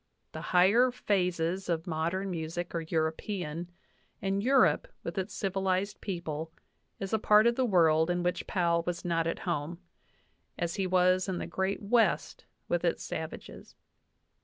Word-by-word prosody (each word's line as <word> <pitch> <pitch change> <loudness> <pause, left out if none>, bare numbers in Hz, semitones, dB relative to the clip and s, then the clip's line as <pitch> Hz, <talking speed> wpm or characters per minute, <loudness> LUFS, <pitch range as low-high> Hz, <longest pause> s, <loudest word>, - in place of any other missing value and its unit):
The - - -7
higher 200 +8 +5
phases 185 -6 -1
of 165 0 -1
modern 175 +3 -2
music 170 +1 -4
are 170 - -1
European, 165 +1 -2 0.5
and 195 0 -1
Eu 260 +6 +2
rope, 165 - +4 0.2
with 170 +3 -3
its 190 +2 -3
civilized 195 0 -1
peoples, 165 -4 -4 0.5
is 195 +2 -4
a 220 - +3
part 210 +1 +5
of 235 - +5
the 260 - +1
world 160 -4 +4
in 175 0 0
which 180 0 -1
Powell 170 -2 +1
was 175 -1 -3
not 165 -1 +1
at 165 - -1
home, 170 -1 -2 0.8
as 170 -1 -2
he 190 -1 -1
was 185 +1 +3
in 185 - -1
the - - -3
Great 190 +2 -2
West 225 +3 +1 0.2
with - - 0
its - - 0
savages. - - -7
180 Hz, 160 wpm, -30 LUFS, 165-195 Hz, 0.8 s, higher